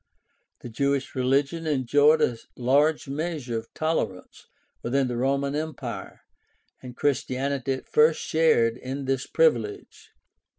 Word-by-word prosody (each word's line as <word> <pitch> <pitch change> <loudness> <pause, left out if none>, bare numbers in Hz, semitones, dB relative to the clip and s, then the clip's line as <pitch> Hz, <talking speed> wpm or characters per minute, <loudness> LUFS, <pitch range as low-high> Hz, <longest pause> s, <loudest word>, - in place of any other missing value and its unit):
The 120 - -8
Jewish 140 +3 -1
religion 140 +5 0
enjoyed 145 +2 +3
a 120 - +1 0.2
large 145 +5 +2
measure 140 -5 -3
of 115 - -14
tolerance 115 - -3 0.3
within 130 +2 0
the 120 - -3
Roman 140 +3 0
Empire, 155 -1 -5 0.6
and 125 -1 -10
Christianity 135 -1 -1
at 130 - -7
first 155 +1 +4
shared 125 -8 +2
in 135 +2 -5
this 135 0 -1
privilege. 425 -4 0
140 Hz, 120 wpm, -25 LUFS, 125-155 Hz, 0.6 s, first